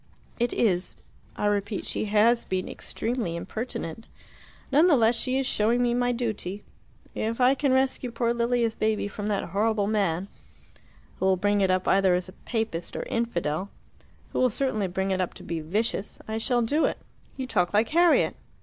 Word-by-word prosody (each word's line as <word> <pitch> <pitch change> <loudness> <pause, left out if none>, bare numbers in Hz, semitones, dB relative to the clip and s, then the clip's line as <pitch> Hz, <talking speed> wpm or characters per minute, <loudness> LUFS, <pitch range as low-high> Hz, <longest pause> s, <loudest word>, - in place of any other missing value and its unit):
"It 240 0 +1
is. 180 -5 +1 0.4
I - - -2
repeat, 205 0 0
she - - -2
has 215 +3 +3
been 185 -1 -2
extremely 225 -8 -3
impertinent. 215 +1 -5 0.6
None 300 +6 +5
the 325 - +6
less 230 -2 +4
she 255 +2 -1
is 270 - 0
showing 230 +1 +2
me 240 -1 +2
my 245 0 +1
duty. 215 -5 -3 0.5
If 225 +2 -2
I 255 +1 +5
can 275 0 +1
rescue 260 -1 +1
poor 235 0 0
Lilia's 235 -1 +1
baby 215 -2 0
from 205 +1 -5
that 205 -4 -1
horrible 210 +2 +1
man, 195 -4 0 0.9
who 190 - +1
will 190 -1 +3
bring 205 +2 +2
it 190 - +3
up 185 0 +1
either 190 -2 +4
as 180 +1 -3
Papist 220 -8 -3
or - - -2
infidel 190 -6 -2 0.6
who - - 0
will 255 - +4
certainly 220 -4 0
bring 190 +2 -2
it 185 0 +1
up 180 - -3
to - - -11
be 170 -1 -3
vicious 200 +6 -2
I 220 0 -2
shall 240 +1 +1
do 295 +8 +2
it." - - -1 0.4
"You 265 - -3
talk 185 -8 +1
like 215 +2 +2
Harriet." 340 +1 +4
220 Hz, 180 wpm, -26 LUFS, 190-240 Hz, 0.9 s, the